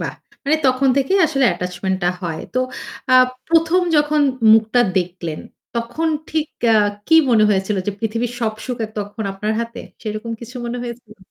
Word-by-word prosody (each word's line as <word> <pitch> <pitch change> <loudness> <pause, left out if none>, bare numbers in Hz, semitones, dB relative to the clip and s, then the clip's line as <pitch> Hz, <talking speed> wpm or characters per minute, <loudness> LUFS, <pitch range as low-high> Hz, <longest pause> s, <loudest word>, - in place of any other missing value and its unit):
বাহ! - - -4 0.3
মানে 295 +3 +3
তখন 260 +1 +3
থেকেই 325 +9 +2
আসলে 275 -4 +1
attachment 180 +2 -3
টা 175 - +3
হয়। 165 -3 -3
তো - - +2 0.5
আ - - +4 0.4
১ম 330 +2 +3 0.2
যখন 295 0 +3 0.3
মুখটা 220 +2 +4 0.2
দেখলেন, 175 -3 -4 0.4
তখন 240 +8 -1 0.2
ঠিক 315 -1 0 0.2
অ্যা 225 - +5 0.3
কি 320 - +4 0.2
মনে 220 -3 +5
হয়েছিল 200 0 +1
যে - - +1
পৃথিবীর 230 +2 -2
সব 220 -2 0
সুখের 235 -4 -3
তখন 205 +2 -5
আপনার 210 +3 -2
হাতে? 235 +1 -5 0.2
সেইরকম 215 +1 -4
কিছু 240 +2 -9
মনে 240 +1 -3
হয়েছিল? 235 -2 -8
230 Hz, 165 wpm, -20 LUFS, 210-265 Hz, 0.5 s, অ্যা